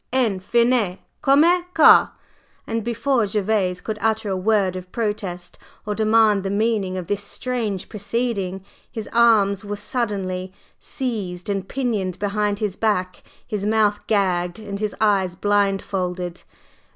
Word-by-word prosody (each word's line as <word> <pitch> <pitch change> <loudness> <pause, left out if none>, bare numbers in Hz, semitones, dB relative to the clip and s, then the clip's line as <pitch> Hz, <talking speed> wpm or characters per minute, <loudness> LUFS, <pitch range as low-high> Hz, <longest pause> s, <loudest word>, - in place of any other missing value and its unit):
enfin, 235 -2 +1 0.2
comme 275 +2 +5
ça!_" 350 -1 +5 0.6
And 225 -1 -2
before 235 0 0
Gervase 195 -3 0
could 215 -1 -4
utter 220 -1 0
a 190 - 0
word 190 -1 +1
of 185 0 -8
protest, 200 -6 -4 0.3
or 210 - -1
demand 215 -1 +3
the 195 - -3
meaning 200 -2 0
of 180 - -4
this 205 +3 -2
strange 220 -3 -3
proceeding, 205 -3 -3 0.3
his 220 -2 -6
arms 215 -4 +4
were 205 0 -4
suddenly 195 -4 -3 0.3
seized 205 -8 -4
and 195 -1 -3
pinioned 215 -9 -2
behind 205 0 -1
his 205 -3 -2
back, 185 -5 -1 0.2
his 210 -3 -4
mouth 210 -1 +1
gagged, 180 -4 +1
and 205 -2 -6
his 210 -1 -2
eyes 195 -4 +2
blindfolded. 190 -3 -1
205 Hz, 130 wpm, -22 LUFS, 190-225 Hz, 0.6 s, comme